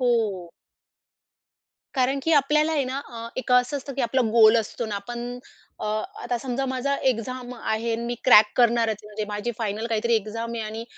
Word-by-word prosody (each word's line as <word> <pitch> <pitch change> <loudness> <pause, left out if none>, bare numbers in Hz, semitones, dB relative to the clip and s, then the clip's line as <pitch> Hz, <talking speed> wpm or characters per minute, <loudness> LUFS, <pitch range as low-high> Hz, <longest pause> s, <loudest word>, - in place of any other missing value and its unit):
हो. 215 -8 0 1.4
कारण 265 +1 +1
की, 325 - +1
आपल्याला 300 +2 +3
आहे 295 -3 +1
ना 260 +2 -3
अ, 230 -1 -7
एक 260 - -4
असं 250 +3 +3
असतं 275 0 -6
की 270 - -1
आपला 245 +2 +1
गोल 225 0 +7
असतो 225 +1 -2
न, 210 - -5
आपण 240 +4 -5 0.4
अ, - - -4 0.4
आता 245 0 -1
समजा 265 +2 -2
माझा 260 +2 -1 0.2
एक्झाम 250 +2 -5
आहे 225 +1 -1
आणि 230 - -2
मी 240 - -2
क्रॅक 210 -4 +7
करणारच. 235 -2 +3
म्हणजे 210 0 -5
माझी 210 +3 -3
फायनल 220 0 -2
काहीतरी 230 +1 +1
एक्झाम 225 +2 -4
आहे 225 - -3
आणि 220 +2 -6
235 Hz, 180 wpm, -24 LUFS, 220-255 Hz, 1.4 s, गोल